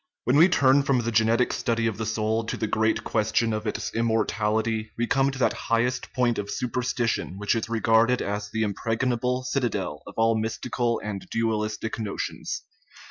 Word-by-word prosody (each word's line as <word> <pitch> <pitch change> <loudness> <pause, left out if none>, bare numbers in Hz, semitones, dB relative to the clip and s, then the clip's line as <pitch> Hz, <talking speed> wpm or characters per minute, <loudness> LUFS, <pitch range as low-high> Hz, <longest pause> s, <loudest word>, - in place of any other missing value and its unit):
\17HEN 125 - +4
we 170 +4 +7
turn 140 -5 +4
from 135 -2 +1
the 115 0 -2
genetic 115 +2 +3
study 115 -1 0
of 110 -2 -1
the 110 - -2
soul 110 +1 0
' - - -10
* - - -14
to - - -3
the 110 - -1
great 110 +1 +1
question 110 +1 +1
of 110 +1 -3
its - - -3
immortality, 110 -1 0
we 120 - +1
come 135 +2 +2
to 135 - -5
that 130 - +2 0.2
highest 120 +2 0
point 125 -2 +1
of 100 0 -4
superstition 120 -5 -1
which 105 +1 +1
is 115 -1 -2
regarded 115 +2 +3
as 105 0 -3
the 110 0 -1
impregnable 120 +4 -1
citadel 125 -2 -2
of - - -10
all 115 0 +4
mystical 115 +2 -1
and 100 -2 -5
dual 115 -1 0
istic 110 +1 -3
notions. 105 -3 -4
115 Hz, 190 wpm, -25 LUFS, 110-125 Hz, 0.2 s, we